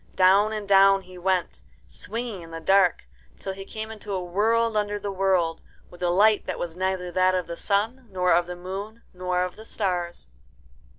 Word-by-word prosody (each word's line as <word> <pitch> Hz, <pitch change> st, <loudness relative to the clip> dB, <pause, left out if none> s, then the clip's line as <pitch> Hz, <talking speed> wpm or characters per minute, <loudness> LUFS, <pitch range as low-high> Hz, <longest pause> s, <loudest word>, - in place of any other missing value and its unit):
Down 195 Hz, +3 st, +5 dB
and 210 Hz, -2 st, -4 dB
down 195 Hz, 0 st, +6 dB
he 180 Hz, 0 st, -12 dB
went, 180 Hz, -, -1 dB, 0.3 s
swinging 215 Hz, -, -6 dB
in 165 Hz, -, -11 dB
the 165 Hz, 0 st, -6 dB
dark, 190 Hz, +2 st, +3 dB, 0.3 s
till 195 Hz, -, -5 dB
he 195 Hz, 0 st, -8 dB
came 220 Hz, +2 st, -6 dB
into 210 Hz, -2 st, -7 dB
a 185 Hz, -2 st, -2 dB
world 225 Hz, +5 st, +1 dB
under 205 Hz, -1 st, 0 dB
the 205 Hz, -1 st, -4 dB
world, 185 Hz, -4 st, +1 dB, 0.3 s
with 175 Hz, -, -15 dB
a 175 Hz, -, +1 dB
light 210 Hz, +4 st, +4 dB
that -, -, -3 dB
was 170 Hz, -2 st, -5 dB
neither 185 Hz, -1 st, -2 dB
that 185 Hz, +1 st, +3 dB
of 180 Hz, -2 st, -1 dB
the 170 Hz, -, -6 dB
sun, 225 Hz, +8 st, -1 dB
nor 180 Hz, -2 st, +2 dB
of 175 Hz, +1 st, +2 dB
the 180 Hz, -, -5 dB
moon, 195 Hz, +6 st, -7 dB
nor 180 Hz, 0 st, -1 dB
of 180 Hz, -1 st, -4 dB
the 220 Hz, -, -10 dB
stars. 180 Hz, -, -3 dB
190 Hz, 195 wpm, -25 LUFS, 180-205 Hz, 0.3 s, down